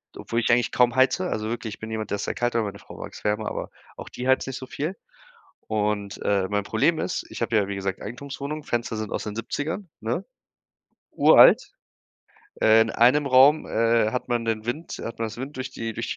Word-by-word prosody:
obwohl 115 - -2
ich - - +1
eigentlich 120 0 +3
kaum 120 -1 +3
heize. 135 +8 +3
Also, 110 0 -2
wirklich, 115 -2 -4
ich - - -31
bin 110 - -7
jemand, 110 -1 -4
der 105 - 0
ist - - -4
sehr - - -3
kalt, 120 -1 -1
aber 115 -2 +2
meine 100 -1 -6
Frau - - -13
mag - - -8
es - - -12
wärmer, 105 +1 0
aber - - -5 0.3
auch - - -8
die 125 - -5
heizt 130 0 +3
nicht 135 0 -5
so 130 - -8
viel. 160 +7 -4 0.7
Und, 105 -2 -2
äh, 100 -2 +1
mein 105 0 0
Problem - - +1
ist, - - -2
ich - - -8
habe 115 - +1
ja, 100 -2 +2
wie 100 - -4
gesagt, 95 -1 -3
Eigentumswohnung, 140 +5 -6
Fenster 120 -4 -2
sind 110 -1 -4
aus - - -3
den 105 0 -5
70ern, 145 - -4
ne? - - -2 0.9
Uralt. - - +7 1.0
Äh, 110 0 +6
in 110 - +1
einem 130 +6 +4
Raum, 135 +4 +6
äh, 115 -1 +2
hat 125 - -3
man 120 -1 0
den 110 -1 -2
Wind 150 +8 -4
hat 115 - -6
man 115 - 0
das 110 - -9
Wind 135 +4 -6
durch 130 0 -5
die 115 0 -5
durch 115 +2 -4
115 Hz, 225 wpm, -25 LUFS, 110-130 Hz, 1.0 s, Uralt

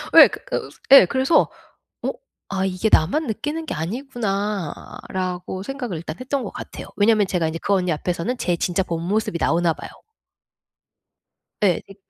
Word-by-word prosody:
예. - - +12
어 - - +3 0.2
그 - - -3 0.2
예, 275 -8 +11
그래서 265 - +3 0.5
어 - - 0 0.4
'아 190 -1 -1
이게 190 +3 0
나만 270 - +3
느끼는 295 +8 -3
게 - - -3
아니구나.'라고 195 - -3
생각을 245 - -4
일단 155 0 -6
했던 260 0 -2
것 200 - -5
같아요. - - -8
왜냐하면 210 -1 +4
제가 175 -4 0
인제 165 +1 -4
그 200 - +2
언니 180 -2 +1
앞에서는 180 +10 -2
제 175 - +1
진짜 180 +3 0
본 165 -2 -3
모습이 205 -4 0
나오나 165 +1 +2
봐요. - - -9 1.7
예. 180 -4 +3
되 195 0 -17
195 Hz, 315 characters per minute, -22 LUFS, 175-240 Hz, 1.7 s, 예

